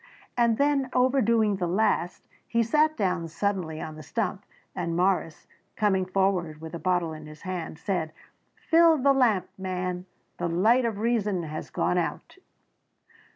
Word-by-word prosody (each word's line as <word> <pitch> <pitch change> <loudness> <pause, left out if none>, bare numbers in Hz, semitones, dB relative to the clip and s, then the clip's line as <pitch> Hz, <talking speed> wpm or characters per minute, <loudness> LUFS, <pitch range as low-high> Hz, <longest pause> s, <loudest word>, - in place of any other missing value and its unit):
And 235 -3 +3
then 280 -2 +2
overdoing 235 -5 +3
the 180 -2 -1
last, 185 -1 0 0.2
he 235 0 +2
sat 305 +7 +2
down 180 -5 0
suddenly 170 -2 -2
on 155 - -6
the - - -8
stump, 150 - -3 0.3
and 165 0 -2
Morris, 180 -3 0 0.3
coming 190 -3 +1
forward 185 -5 0
with 160 +1 -9
a 170 - -4
bottle 175 -3 0
in 155 -1 -9
his 155 0 -13
hand 180 -4 -5
said, 165 -3 -2 0.4
"Fill 330 -1 +4
the 280 0 +4
lamp, 235 -8 +2
man 185 -1 -3 0.3
the - - 0
light 220 +9 +3
of 225 -3 -1
reason 210 -5 0
has 155 -1 -6
gone 180 - 0
out." 175 - -4
190 Hz, 155 wpm, -27 LUFS, 170-235 Hz, 0.4 s, Fill